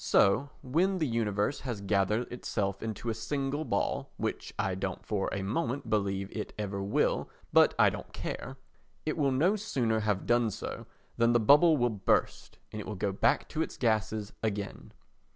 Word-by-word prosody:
So 110 +8 +4
when 175 +9 +1
the 160 - +1
universe 110 -1 0
has 120 -6 -4
gathered 100 +4 0
itself 100 -5 -2
into 115 +1 -3
a - - -1
single 135 +6 -2
ball - - -1
(which - - -3
I 95 -2 0
don't 95 0 -4
for 100 -3 -1
a 100 - -2
moment 125 +6 -2
believe 100 -2 -1
it 105 - -4
ever 100 -2 -3
will, 100 +1 +1 0.2
but - - +6
I - - +6
don't - - -8
care) - - -5 0.5
it 155 - 0
will 140 -4 +2
no 165 +11 +3
sooner 125 - 0
have 105 -3 0
done 120 -1 +3
so, - - -6 0.3
than 115 0 +4
the 120 - +5
bubble 150 +7 +6
will 120 -2 +2
burst 100 -3 0
and 105 - -5
it - - -9
will 105 - -4
go 100 +1 -1
back 95 - +2
to 160 - -2
its - - -3
gases 110 -2 0
again. 105 -2 -3
110 Hz, 180 wpm, -30 LUFS, 100-135 Hz, 0.5 s, but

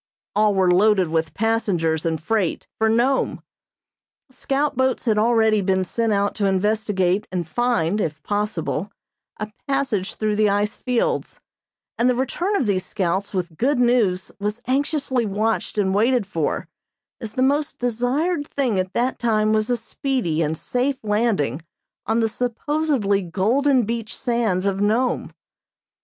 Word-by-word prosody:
All 210 -1 +3
were 185 -2 +3
loaded 190 -2 +4
with 160 0 -1
passengers 180 -8 0
and 160 -1 -1
freight 190 +2 -1
for 220 0 +3
Nome. 245 +4 +1 0.9
Scout 275 +3 -1
boats 260 +1 0
had 215 -3 +2
already 220 -2 +3
been 190 0 +1
sent 225 +4 -1
out 200 0 +1
to 200 - +1
investigate 195 -1 +1
and 175 -3 -2
find, 215 -4 0
if 155 -3 -3
possible, 205 -3 -2 0.5
a 215 0 -5 0.2
passage 260 -8 -1
through 215 -1 -1
the 215 -1 +4
ice 205 +1 0
fields, 250 -2 -1 0.6
and 245 +2 +4
the 250 - +2
return 345 +10 -1
of 275 - +1
these 190 -3 0
scouts 190 +1 -2
with 175 -4 -3
good 270 +3 +2
news 235 -7 +2
was 210 +3 -2
anxiously 265 -2 0
watched 215 +2 -1
and 190 -2 +1
waited 235 +2 +2
for, 165 -5 -2 0.5
as 220 -3 -5
the 255 - +1
most 285 +2 +1
desired 265 +7 0
thing 250 -8 0
at 185 0 -3
that 250 +2 0
time 215 -2 +2
was 215 +1 +1
a 245 - +2
speedy 225 - -2
and 160 0 -1
safe 255 - -1
landing 210 - 0 0.5
on 225 +1 +2
the 225 - +2
supposedly 245 -2 0
golden 240 +10 +2
beach 230 0 -4
sands 230 -7 0
of 195 0 0
Nome. 230 +5 +1
215 Hz, 150 wpm, -22 LUFS, 190-245 Hz, 0.9 s, loaded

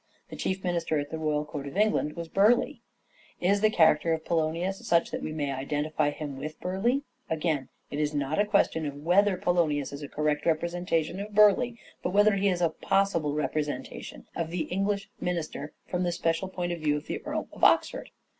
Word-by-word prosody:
The - - -7
chief 190 0 -2
minister 170 -3 0
at 145 0 -3
the 160 - -4
royal 150 -1 0
court 145 -2 -6
of 140 - -7
England 210 -8 +2
was 170 -1 -5
Burleigh. 235 - +3 0.6
Is 200 +3 +2
the 215 - +5
character 160 -4 +4
of 160 0 -3
Poionius 170 +4 -1
such 170 0 +2
that - - -3
we - - -4
may 145 -3 -2
identify 145 +3 -1
him 145 -2 -6
with 155 +3 -6
Burleigh? 220 +9 0 0.3
Again 155 -4 -1 0.2
it 145 - -3
is 150 -1 +1
not 145 +3 -1
a 205 - +4
question 165 -6 +2
of 140 - -5
whether 190 +3 +4
Poionius 155 -6 +1
is 140 - -6
a 145 - -6
correct 150 0 0
representa 170 0 +1
tion 180 - -7
of 205 +1 -6
Burleigh, 210 +4 +5 0.3
but 180 - -2
whether 205 +1 +5
he 200 0 +2
is 180 -2 -1
a 170 - +4
possible 170 -4 +1
representation 150 - -3
of 165 -1 -2
the 170 0 -2
English 200 +2 0
minister 155 -4 -3
from 180 - -2
the 175 -1 +1
special 165 +2 -1
point 175 -2 -3
of 170 - -3
view 150 -1 +1
of 150 - -7
the - - -4
Earl - - -3
of - - -13
Oxford. - - +3
165 Hz, 200 wpm, -28 LUFS, 150-190 Hz, 0.6 s, the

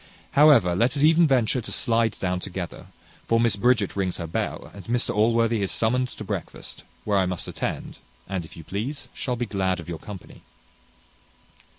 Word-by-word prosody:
However, 140 -12 +6
let 120 +10 +2
us 140 - +2
e'en 165 +2 +6
venture 125 -2 +2
to - - -7
slide 115 -2 +1
down 90 -1 -1
together; 90 -2 -6 0.4
for 115 - +3
Miss 115 -1 +3
Bridget 110 -2 +2
rings 95 -2 -1
her 85 - -4
bell, 80 - -3
and 100 - -10
Mr 120 +1 0
Allworthy 115 +1 +2
is 100 - 0
summoned 125 +3 +1
to 110 - -9
breakfast, 95 - -6 0.2
where 100 -2 +2
I 95 - +2
must 90 -2 -3
attend, - - -4 0.3
and, 95 -2 -3
if 80 - -13
you 80 - -9
please, 115 - -4
shall 125 - -2
be 120 0 -2
glad 95 -4 -1
of 85 - -9
your 85 -2 -5
company. 100 -4 -10
110 Hz, 185 wpm, -25 LUFS, 95-120 Hz, 0.4 s, However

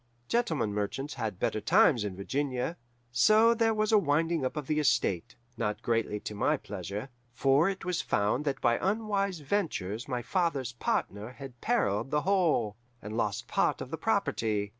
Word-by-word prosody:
Gentlemen 160 - 0
merchants 105 +8 -3
had 110 -5 -4
better 110 - -1
times 165 - +4
in 100 -3 -4
Virginia. 130 - -2 0.4
So 215 - +5
there 225 -1 +2
was 215 0 +1
a 215 - +6
winding 160 -1 +1
up 130 +4 -2
of 150 - -3
the 155 +2 0
estate, 95 - +1 0.2
not 105 -2 -2
greatly 115 -2 0
to - - -5
my 145 +9 +1
pleasure; 105 +3 -6 0.3
for 140 +7 +4
it 190 -3 -5
was 180 -2 0
found 105 +7 0
that 135 -2 -1
by 120 0 +3
unwise 200 -3 0
ventures 135 - -2
my 125 -3 -2
father's 140 - -1
partner 110 -1 -2
had 125 -1 -10
perilled 105 +5 +1
the 150 +1 +1
whole, 165 - +1 0.2
and 105 0 -7
lost 105 -3 -1
part - - +1
of - - -7
the - - -1
property. 105 -2 0
135 Hz, 170 wpm, -30 LUFS, 105-170 Hz, 0.4 s, a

